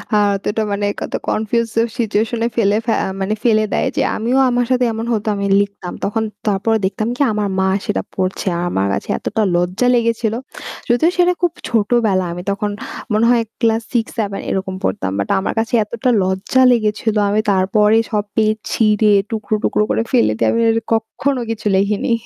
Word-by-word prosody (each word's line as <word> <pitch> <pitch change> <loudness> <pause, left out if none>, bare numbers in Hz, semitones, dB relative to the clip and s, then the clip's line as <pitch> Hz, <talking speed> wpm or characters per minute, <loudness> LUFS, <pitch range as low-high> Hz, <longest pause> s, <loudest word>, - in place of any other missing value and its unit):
আ - - +5 0.2
এতটা 210 +2 -2
মানে 200 0 -1 0.2
কত - - -5
confuse 225 +1 0
ও - - +3
situation 225 0 0
এ - - +2
ফেলে 210 -2 +2
ফে 230 - +1
আ - - -2
মানে 195 +2 -1
ফেলে 215 -3 +3
দেয় - - +1
যে - - +1
আমিও 240 +4 0
আমার 245 0 +1
সাথে 250 -1 +3
এমন 225 +1 -4
হতো 215 -1 -2
আমি 200 0 -2 0.2
লিখতাম। 200 -3 -5
তখন 220 +2 -1 0.2
তারপরে 210 +2 +1
দেখতাম 215 +3 -2
কি - - -4
আমার 210 -1 -1
মা 190 - +2 0.2
সেটা 95 - -1
পড়ছে। 185 +1 -2 0.2
আমার 100 - 0
কাছে - - -3
এতটা 220 - -2
লজ্জা 180 +8 +1
লেগেছিল। 230 -2 0 0.6
যদিও 245 +8 +3
সেটা 360 0 +4
খুব 350 -2 +2 0.2
ছোট 215 -4 0 0.2
বেলা 185 -2 +1
আমি 175 - -6
তখন 205 +1 -2 0.4
মনে 215 +2 +3
হয় 240 -1 +4 0.2
ক্লাস 225 -1 +2
6 230 -2 +2
7 200 -2 -2
এরকম 190 0 -2
পড়তাম। 95 0 -1
বাট 100 - -2
আমার 190 - -2
কাছে 225 +2 -2
এতটা 235 +4 -2
লজ্জা 190 +7 +1
লেগেছিল। 220 -1 0
আমি 210 +1 +2
তারপরে 210 +3 +3
সব 210 -2 0
পেজ 215 -1 +2 0.2
ছিঁড়ে 215 -1 +3 0.2
টুকরো, 220 -1 -2
টুকরো 210 - +2
করে - - +1
ফেলে 235 - +3
দিয়ে - - +1
আমি 230 - +1
আর 225 - +2 0.2
কক্ষনো 225 +4 0
কিছু 220 -1 -3
লেখেনি। 200 +4 0
215 Hz, 190 wpm, -18 LUFS, 200-230 Hz, 0.6 s, আ